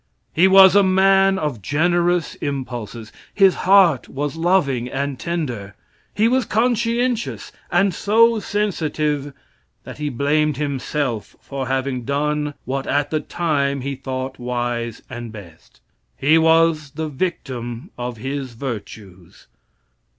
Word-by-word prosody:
He 175 +4 +5
was 190 -1 +8
a 205 - +7
man 195 0 +4
of 150 - -3
generous 175 - +1
impulses. 120 -5 -5 0.2
His 195 -2 +5 0.2
heart 185 -9 +5
was 145 +2 -3
loving 160 -8 +1
and 140 0 -3
tender. 125 - -4 0.4
He 215 +2 +3
was 255 +2 +2
conscientious, 235 +1 0 0.2
and 195 +1 +3
so 225 +5 +3
sensitive 155 -9 -1 0.5
that - - -10
he 150 -1 -2
blamed 145 +2 +1
himself 140 -5 -3
for 135 -2 -5
having 130 -1 -2
done 150 +2 -1
what 135 +1 -3
at 145 0 0
the 155 - +1
time 140 -4 -1
he 140 +2 -3
thought 130 -1 -5
wise 120 -2 -3
and 120 -3 -7
best. 95 -7 -14 0.4
He 155 +4 +4
was 160 -2 +3
the 160 0 -3
victim 130 - -4
of 120 -1 -5
his 135 +1 -5
virtues. 105 -7 -8
145 Hz, 125 wpm, -21 LUFS, 130-175 Hz, 0.5 s, was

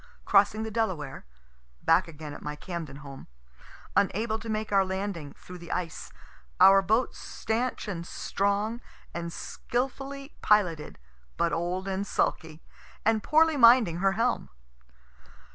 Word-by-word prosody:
crossing 205 +2 +4
the 220 - -5
Delaware, 180 - -2 0.6
(back 170 +3 +4
again 155 -2 -8
at - - -9
my 150 0 -5
Camden 150 -4 -7
home,) 135 -1 -10 0.7
unable 220 +3 +1
to 225 - -8
make 215 0 -2
our 195 -1 +5
landing, 190 -5 -4
through 180 0 -12
the 170 0 -9
ice; 165 -3 -4 0.5
our 195 0 +8
boat 220 +6 +1
stanch 235 +2 -3
and 170 -4 -5
strong 205 +4 -1 0.3
and 170 0 -4
skilfully 270 - -4
piloted, 180 -8 +2 0.4
but 170 0 +1
old 180 +3 -2
and 195 +1 -2
sulky, 160 -3 -1 0.4
and 220 0 +3
poorly 315 +4 +4
minding 235 -8 +6
her 195 +2 +2
helm. 235 +4 0
195 Hz, 130 wpm, -28 LUFS, 170-225 Hz, 0.7 s, our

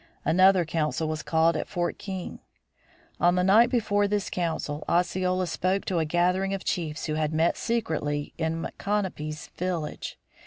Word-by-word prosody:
Another 185 +2 +5
council 160 0 -1
was 155 -1 -2
called 160 +1 +2
at 155 - -2
Fort 175 -3 -2
King. 190 -3 -6 0.8
On 175 +1 +4
the 180 - +2
night 220 +6 +6
before 205 -5 +2
this 205 -1 -1
council, 160 -4 -2
Osceola 185 +1 +1
spoke 185 +3 -1
to 180 -3 0
a 160 - +1
gathering 180 +4 +1
of 195 - -6
chiefs 160 -4 -2
who 155 - -2
had 155 0 0
met 160 +2 +2
secretly 150 -10 -2
in 165 0 -2
Micanopy's 185 -7 -3
village. 175 -4 -3
175 Hz, 155 wpm, -27 LUFS, 160-190 Hz, 0.8 s, night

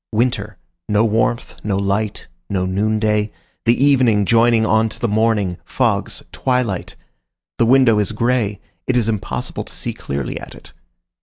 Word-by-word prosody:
Winter: 110 -3 -1 0.3
no 105 +2 +3
warmth, 115 +2 0
no 100 -2 0
light, 100 +2 -1 0.2
no 95 -2 0
noonday, 105 +2 0 0.3
the 120 +4 +3
evening 125 -7 +4
joining 115 +1 +4
on 110 0 +2
to - - -9
the 120 - 0
morning, 105 -4 +1
fogs, - - -1
twilight; 125 -8 -1 0.6
the 115 - +4
window 125 -4 +5
is 105 +1 +1
gray; 110 -2 0 0.3
it 130 - +2
is 115 -3 +1
impossible 110 -3 -3
to - - -11
see - - -3
clearly 70 -2 -4
at - - -10
it. - - -14
110 Hz, 150 wpm, -19 LUFS, 105-115 Hz, 0.6 s, window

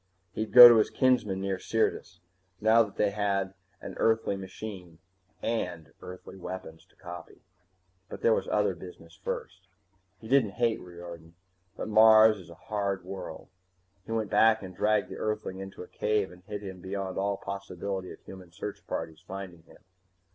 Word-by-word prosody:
He'd 110 +1 -3
go 125 -1 +13
to 120 -1 +7
his 110 - +3
kinsmen 120 -7 +1
near 95 -1 -2
Syrtis. 110 -3 -1 0.4
Now 110 +2 +5
that 105 -3 -2
they 105 -1 +1
had 100 -2 -1 0.3
an - - -7
Earthly 110 -3 +2
machine, 95 -3 -8 0.5
and 90 -8 -3
Earthly 90 +1 -10
weapons 90 -3 -8
to - - -30
copy 90 0 -11 0.7
But - - -9
there 115 - +5
was - - -1
other 105 -2 +1
business 85 -2 -12
first. - - -5 0.5
He 110 - -11
didn't 120 -5 +3
hate 115 -2 +1
Riordan, 85 -1 -11 0.4
but - - -4
Mars 110 0 +7
is 90 - -14
a 85 - -12
hard 100 0 -3
world. 95 +1 -8 0.5
He 115 - -10
went 110 -2 -2
back 110 -2 +4
and 95 -1 -9
dragged 105 -1 +2
the - - -7
Earthling 105 -3 -3
into 95 -1 -8
a - - -12
cave 105 -3 -1
and 90 0 -15
hid 105 0 -6
him 95 -2 -8
beyond 95 0 -4
all 100 0 0
possibility 100 -1 -5
of - - -12
human 95 -2 -12
search 85 - -6
parties 80 0 -5
finding 95 -3 -8
him. 80 - -19
100 Hz, 170 wpm, -28 LUFS, 90-110 Hz, 0.7 s, go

